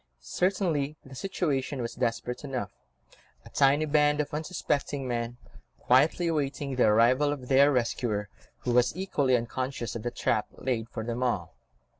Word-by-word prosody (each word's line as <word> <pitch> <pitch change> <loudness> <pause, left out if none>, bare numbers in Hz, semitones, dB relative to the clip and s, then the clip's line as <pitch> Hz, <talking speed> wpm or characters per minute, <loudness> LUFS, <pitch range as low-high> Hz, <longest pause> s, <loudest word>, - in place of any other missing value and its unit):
Certainly 155 - 0
the 135 - -12
situation 140 -4 -2
was 115 -1 -3
desperate 120 +1 -2
enough; 135 -4 -4 0.7
a - - -13
tiny 140 +2 +3
band 150 0 +3
of 150 - -2
unsuspecting 145 -4 -2
men, 120 0 -3 0.4
quietly 140 +7 +3
awaiting 145 -3 -1
the 125 - +4
arrival 120 +7 +4
of 130 -4 -6
their 140 +2 +6
rescuer, 115 -4 0 0.3
who 125 - -1
was 125 +6 +3
equally 140 -9 +2
unconscious 120 +1 -4
of 115 - -4
the 120 - -2
trap 115 -2 0
laid 120 -3 -3
for 110 - -5
them 120 +2 -3
all. 125 -1 -1
130 Hz, 150 wpm, -28 LUFS, 120-145 Hz, 0.7 s, their